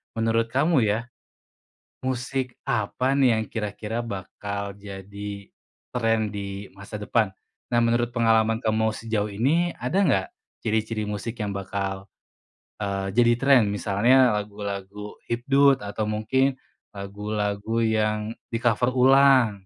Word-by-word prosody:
menurut 115 0 +1
kamu 140 -3 +3
ya, 105 +2 +1 1.0
musik 130 0 -2
apa 120 +4 0
nih 125 -5 +4
yang 110 - 0
kira-kira 105 +1 -4
bakal 100 0 -5
jadi 100 0 -8 0.5
trend 115 -3 +1
di 100 0 -5
masa 100 +2 -8
depan? 105 0 +1 0.4
Nah 120 - +3
menurut 120 +1 +2
pengalaman 115 -1 +3
kamu 110 0 +2
sejauh 110 -2 -2
ini, 155 +12 +1
ada 125 +11 -1
nggak 100 - +2 0.4
ciri-ciri 110 0 -1
musik 110 +3 -5
yang 105 - -2
bakal, 95 0 -3 0.8
eee, 100 -1 -2
jadi 120 0 +5
trend? 135 -5 +5
Misalnya 120 +7 +4
lagu-lagu 105 0 -5
hipdut 135 +1 +3
atau 105 +1 -3
mungkin 130 +6 +1 0.4
lagu-lagu 105 +2 -3
yang 110 -1 0 0.2
di-cover 120 +1 +1
ulang? 130 -2 +6
110 Hz, 115 wpm, -25 LUFS, 100-120 Hz, 1.0 s, ulang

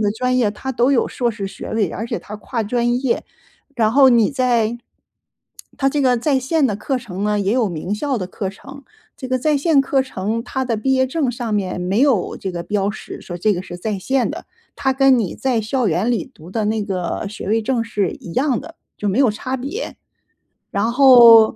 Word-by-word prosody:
的 210 -1 +2
专 250 +3 0
业， 225 -5 +2
它 240 +6 -5
都 250 +2 +2
有 260 - +2
硕 240 -2 -1
士 210 -3 -5
学 - - -8
位， 210 -6 0
而 225 +5 -4
且 - - -3
它 210 - -8
跨 230 +2 -3
专 240 +3 0
业。 265 - 0 0.5
然 220 -4 +2
后 270 +1 +7
你 235 -4 +4
在 240 -4 +1 1.0
它 270 - +2
这 290 - 0
个 255 -2 +3
在 270 +3 +1
线 290 +4 +1
的 215 - -1
课 265 +5 -2
程 205 -6 -6
呢， 210 0 +1
也 200 +1 0
有 240 -3 +2
名 175 +3 -3
校 275 +5 -1
的 190 -5 -3
课 195 0 -4
程。 275 +8 -11 0.3
这 260 - -6
个 255 - +1
在 300 +3 +2
线 290 0 +3
课 275 -2 +1
程， 220 -3 -3
它 265 +1 -2
的 235 -3 -1
毕 265 +5 0
业 260 0 +3
证 275 -1 -1
上 235 -2 -4
面 190 -3 -1
没 185 +5 0
有 260 -10 +2
这 190 - -3
个 170 -1 -4
标 200 +1 -1
识， 215 - -9
说 175 - -7
这 210 +5 +2
个 180 - -2
是 175 -2 -8
在 205 +3 -3
线 260 +7 0
的。 - - -7 0.3
它 265 -1 +1
跟 265 -1 +4
你 205 -7 -2
在 255 -4 0
校 225 +2 0
园 180 +7 0
里 245 +1 -2
读 170 -7 -14
的 220 +2 -1
那 215 0 0
个 185 +1 -3
学 205 -2 -7
位 225 +2 +2
证 235 +1 0
是 205 -4 -1
一 170 - -10
样 260 -1 +1
的， 325 +3 -12 0.2
就 205 - -2
没 200 +5 0
有 270 -3 +5
差 255 +5 -4
别。 290 - -5 0.7
然 205 +4 0
后， 240 -4 +8
235 Hz, 240 characters per minute, -20 LUFS, 205-265 Hz, 1.0 s, 后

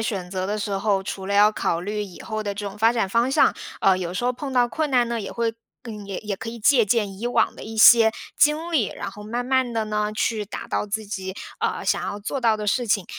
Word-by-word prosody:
选 195 -5 -3
择 185 -1 -2
的 210 +2 -2
时 205 0 -3
候， 195 0 +1
除 190 0 -6
了 200 - -1
要 210 +1 +6
考 170 -5 -1
虑 210 +3 -3
以 190 -4 -10
后 215 -1 -4
的 200 -1 -3
这 205 - -5
种 200 +2 -11
发 225 +2 +4
展 225 -5 0
方 235 +6 +1
向， - - +4 0.3
呃， 190 -1 +4
有 180 -1 -4
时 220 +6 -2
候 250 - +2
碰 270 +2 -6
到 245 -1 +3
困 310 +3 -1
难 245 -3 +3
呢， 235 -1 -2
也 200 - -6
会 230 -1 -1 0.3
更 210 -5 -8
也 195 -2 -5
也 210 -2 -4
可 225 +2 -7
以 235 - -6
借 240 0 +5
鉴 205 -2 0
以 235 - -3
往 245 - +1
的 - - -9
一 225 +1 -8
些 225 0 +8 0.2
经 310 +3 +2
历， 270 - +2
然 200 - -6
后 210 +1 -11
慢 240 +3 -3
慢 260 -1 +1
地 225 -1 -1
呢， 210 0 -1
去 215 0 -1
达 205 - -7
到 - - -1
自 215 +2 -3
己， 190 -2 -5 0.2
呃， - - -2
想 - - +1
要 205 - -4
做 260 +6 -3
到 225 -3 +3
的 210 0 -5
事 245 +3 +1
情。 200 -3 +1
215 Hz, 285 characters per minute, -23 LUFS, 200-235 Hz, 0.3 s, 些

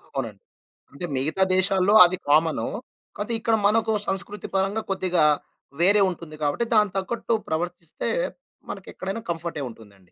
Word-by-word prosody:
అవునండి. 115 -7 -4 0.5
అంటే 175 +5 -5
మిగతా 155 +8 0
దేశాల్లో 190 +2 +4
అది 185 +1 -2
కామను. 155 -5 +2 0.5
కాపోతే 210 +3 -3
ఇక్కడ 225 0 +1
మనకు 220 +1 +2 0.2
సంస్కృతి 195 +1 -4
పరంగా 195 +3 0
కొద్దిగా 180 -4 +1 0.6
వేరే 200 +4 +5
ఉంటుంది 165 -3 -9
కాబట్టి, 145 +11 0
దానికి 210 -3 +3
తగ్గట్టు 230 +4 -2
ప్రవర్తిస్తే 170 0 -3 0.6
మనకెక్కడైనా 195 +5 -6
కంఫర్టే 165 -4 -5
ఉంటుందండి. 105 -3 -16
185 Hz, 125 wpm, -24 LUFS, 155-205 Hz, 0.6 s, వేరే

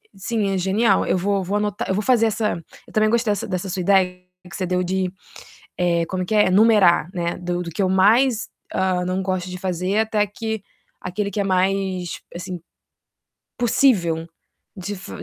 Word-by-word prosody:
sim, 205 +1 -1
é - - 0
genial. 195 +3 +2
Eu - - +1
vou 195 +1 0
vou 200 +3 -1
anotar 210 -1 -2
eu - - +2
vou 210 - -1
fazer 235 -2 +4
essa 210 -5 -1 0.3
eu - - -16
também 215 0 +3
gostei 230 -2 +2
dessa 205 - -2
dessa 185 -1 -3
sua 185 0 -2
ideia 180 -1 +2 0.3
que - - -9
você 185 - -2
deu 180 0 0
de, 185 0 -1 0.7
eh, 170 -1 +2
como 185 +1 -3
é - - -10
que 215 - -2
é? 210 -3 +4
Numerar, 195 -5 +5
né. 170 -1 -2
Do 175 0 -2
do 170 - -6
que 180 +5 -2
eu 185 - +2
mais, 220 +6 +3 0.3
hã, 185 -1 +1
não 185 +1 -1
gosto 185 -1 -2
de 180 - -6
fazer 185 +2 -1
até 215 -1 +1
que 220 0 -5 0.4
aquele 200 +3 -3
que 200 +1 -2
é - - +1
mais, 190 -1 0
assim, 180 0 -6 1.0
possível 190 -10 +2 0.5
de 195 +2 -5
f 190 - -10
190 Hz, 195 wpm, -22 LUFS, 180-210 Hz, 1.0 s, Numerar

